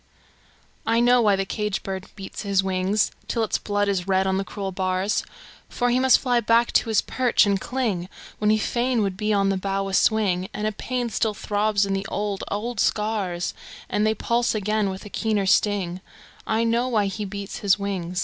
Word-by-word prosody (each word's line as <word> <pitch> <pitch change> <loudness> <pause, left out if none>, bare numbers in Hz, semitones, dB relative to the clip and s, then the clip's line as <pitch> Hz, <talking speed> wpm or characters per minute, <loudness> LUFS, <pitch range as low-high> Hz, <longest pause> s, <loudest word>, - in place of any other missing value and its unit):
I 230 +1 +2
know 245 +1 +5
why 210 -3 +4
the 195 0 -1
caged 210 0 -2
bird 190 -1 -5
beats 195 -2 -7
his 200 -2 +1
wing 190 +2 -1 0.3
Till 230 - 0
its 220 - 0
blood 205 0 0
is 195 -2 -1
red 190 0 +2
on 190 0 +1
the 195 - 0
cruel 195 0 -5
bars; 185 +2 0 0.5
For 245 0 0
he 250 - +3
must 260 -1 +6
fly 245 -2 +1
back 230 +1 +3
to 230 - +2
his 220 - +3
perch 250 -3 +2
and 200 -1 +1
cling 215 -9 -2 0.3
When 210 - +2
he 215 - +4
fain 240 +1 0
would 195 -2 -1
be 210 +2 -1
on 200 -1 +2
the 195 - +1
bough 195 +1 -2
a - - -6
swing; 195 -4 +2
And 210 +1 -2
a 215 - +1
pain 245 +2 -3
still 215 +1 0
throbs 205 0 +1
in 195 - -2
the 195 0 -2
old, 205 -1 -3
old 220 +2 -3
scars 205 -6 0 0.4
And 210 - +1
they 220 0 +2
pulse 235 +2 0
again 210 0 0
with 190 +1 -7
a - - -8
keener 215 -3 0
sting 190 -2 +1 0.5
I 220 +1 +1
know 235 +2 +1
why 220 -5 +1
he 200 +2 -3
beats 200 0 -6
his 200 -2 +3
wing! 190 -3 -4
205 Hz, 205 wpm, -24 LUFS, 195-220 Hz, 0.5 s, must